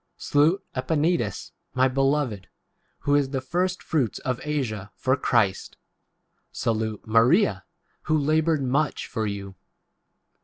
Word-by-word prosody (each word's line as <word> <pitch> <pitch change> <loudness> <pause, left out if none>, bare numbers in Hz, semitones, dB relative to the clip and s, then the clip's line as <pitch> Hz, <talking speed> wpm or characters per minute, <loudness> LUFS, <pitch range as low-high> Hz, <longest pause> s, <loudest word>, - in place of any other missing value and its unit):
Salute 160 +7 +2
Epaenetus, 145 - 0 0.2
my 130 +1 +4
beloved, 135 -6 0 0.5
who 145 - +1
is 145 -2 +3
[the] 135 -1 -2
first 180 +7 -1
fruits 135 - 0
of 130 -2 -3
Asia 120 -10 -3
11 - - -42
for 130 0 +1
Christ. 115 -7 0 0.7
6 - - -15
Salute 110 -2 -1
Maria, 120 - +3 0.4
who 155 0 +2
laboured 155 0 +2
much 135 +3 0
7 - - -11
for 110 -3 -1
you. 100 -1 -5
135 Hz, 130 wpm, -25 LUFS, 115-150 Hz, 0.7 s, my